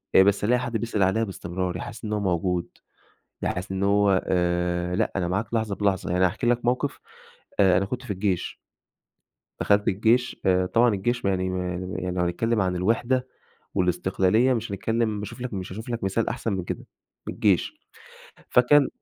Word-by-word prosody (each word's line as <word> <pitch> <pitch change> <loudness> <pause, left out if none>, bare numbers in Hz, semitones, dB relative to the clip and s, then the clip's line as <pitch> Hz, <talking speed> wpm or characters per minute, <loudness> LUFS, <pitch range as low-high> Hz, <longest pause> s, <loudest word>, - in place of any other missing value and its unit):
آآ، 95 - +9
بس 100 +1 +2
ألاقي 125 +4 +3
حد 120 -2 -2
بيسأل 110 -3 0
عليا 105 +5 +2
بإستمرار، 90 -3 -3
يحسسني 105 +3 -7
إن - - -2
هو 105 - 0
موجود، 90 -1 0 0.8
يحسسني 95 +1 -2
إن - - -2
هو 100 -1 +3
آآ، 90 0 0
لأ، 110 - 0
أنا 90 -2 0
معاك 100 +6 -2
لحظة 110 -3 0
بلحظة، 100 -4 0
يعني 90 +1 +4
هاحكي 105 +7 -2
لك 120 0 +2
موقف 125 +3 0 0.6
آآ، 95 -2 +5
أنا 100 - 0
كنت 125 +5 -4
في 105 - -3
الجيش. 95 -2 -2 1.0
دخلت 105 0 +2
الجيش، 115 +5 +2
آآ، 95 -1 +3
طبعًا 115 +6 +3
الجيش 120 +5 -1
ما 100 - +3
يعني 95 0 -1
ما 90 -1 -2
يعني 90 +2 -4
يعني 90 0 -3
لو - - +2
هنتكلم 110 +6 0
عن 90 -1 0
الوحدة 120 +7 +1 0.5
والاستقلالية 95 +6 +2
مش 115 -3 -3
هنتكلم 110 +1 -1
باشوف 105 +4 -7
لك 125 -3 -4
مش 95 -2 -5
هاشوف 110 +5 -7
لك 115 -3 -3
مثال 95 +4 0
أحسن 115 - -2
من 95 -2 -2
كده، - - -5 0.4
من - - -3
الجيش - - +1 0.8
فكان 140 +3 +5
100 Hz, 185 wpm, -25 LUFS, 90-115 Hz, 1.0 s, آآ